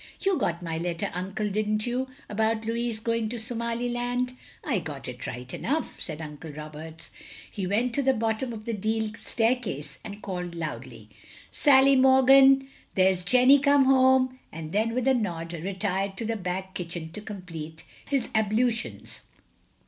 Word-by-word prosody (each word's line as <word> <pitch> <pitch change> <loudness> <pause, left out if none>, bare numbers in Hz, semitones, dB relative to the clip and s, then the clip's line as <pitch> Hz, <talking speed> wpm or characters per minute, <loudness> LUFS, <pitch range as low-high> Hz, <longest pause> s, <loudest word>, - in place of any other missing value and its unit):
"You 390 -1 +2
got 170 - -1
my 165 -1 -3
letter. 170 -1 -2
Uncle, 195 +4 -3
didn't 215 +1 0
you, 250 +2 -1 0.2
about 220 +1 0
Louis 230 0 -1
going 230 0 -1
to 240 - -4
Somaliland?" 240 +2 -2 0.3
"I 265 - 0
got 150 -5 -7
it 125 0 -6
right 125 +1 -7
enough," 300 +5 -2
said 160 -1 -4
Uncle 150 +1 -8
Roberts. 155 +2 -9 0.4
He 195 -3 -3
went 230 +5 +1
to 280 - +1
the 265 -1 +3
bottom 225 +2 -1
of 215 -2 -8
the 230 - -2
deal 220 +1 -1
staircase 225 - -1
and 210 -1 -9
called 180 -3 -4
loudly, 125 -8 -6 0.4
"Sally 275 -1 +5
Morgan! 265 +1 +6 0.3
Here's 185 -1 +3
Jenny 255 +7 +6
come 280 -1 +4
home," 260 -1 +4
and 160 0 -7
then 220 +4 +1
with 255 0 0
a 265 - +5
nod, 175 -8 -2
retired 195 +2 -2
to 230 - -3
the 225 +1 -1
back 190 -1 -4
kitchen 170 -2 -5
to 210 - -8
complete 165 -6 -8 0.2
his 275 -4 0
ablutions. 220 +2 0
215 Hz, 155 wpm, -27 LUFS, 175-245 Hz, 0.4 s, Morgan